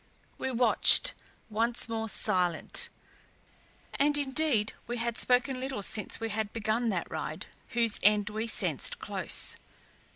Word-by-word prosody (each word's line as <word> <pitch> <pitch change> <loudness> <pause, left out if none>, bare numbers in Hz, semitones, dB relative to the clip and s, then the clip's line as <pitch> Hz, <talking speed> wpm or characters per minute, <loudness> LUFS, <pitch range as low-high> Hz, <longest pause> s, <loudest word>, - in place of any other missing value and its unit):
We 265 - -3
watched, 245 -1 +5 0.3
once 230 +2 -1
more 225 -1 -3
silent; 180 -6 -1 1.0
and 290 +1 +2
indeed 275 -6 0
we 240 +1 -4
had 235 0 -2
spoken 255 +2 +1
little 260 -5 -4
since 210 +1 +1
we 225 0 -4
had 215 -1 -3
begun 225 +1 -1
that 185 -5 -3
ride - - -5 0.3
whose 230 -2 +5
end 210 +1 +3
we 220 +2 -3
sensed - - +1
close. 435 - +1
230 Hz, 130 wpm, -29 LUFS, 210-255 Hz, 1.0 s, watched